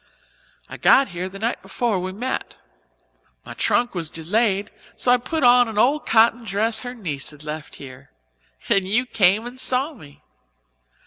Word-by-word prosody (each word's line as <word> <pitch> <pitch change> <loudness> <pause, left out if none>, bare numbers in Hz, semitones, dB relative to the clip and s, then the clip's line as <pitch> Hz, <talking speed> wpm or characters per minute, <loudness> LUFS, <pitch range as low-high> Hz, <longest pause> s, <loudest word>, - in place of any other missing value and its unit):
I - - -9
got 275 - +4
here 180 +1 -5
the 195 - -10
night 225 +4 -2
before 230 -6 -2
we 185 +1 -4
met. 245 +7 -4 0.9
My - - -8
trunk 240 0 0
was 170 -4 -4
delayed 200 +5 -1 0.2
so 245 - +1
I 250 - +6
put 310 +5 -3
on 245 0 +6
an 220 -2 -7
old 275 +7 +2
cotton 230 +1 +4
dress 220 +2 0
her 245 +1 -7
niece 155 - -4
had 150 0 -13
left 150 0 -7
here 130 -2 -12 0.6
and 195 -1 +2
you 235 +6 +2
came 210 -1 +2
and 245 +1 -8
saw 260 +4 +1
me. 145 - -16
220 Hz, 170 wpm, -22 LUFS, 185-245 Hz, 0.9 s, I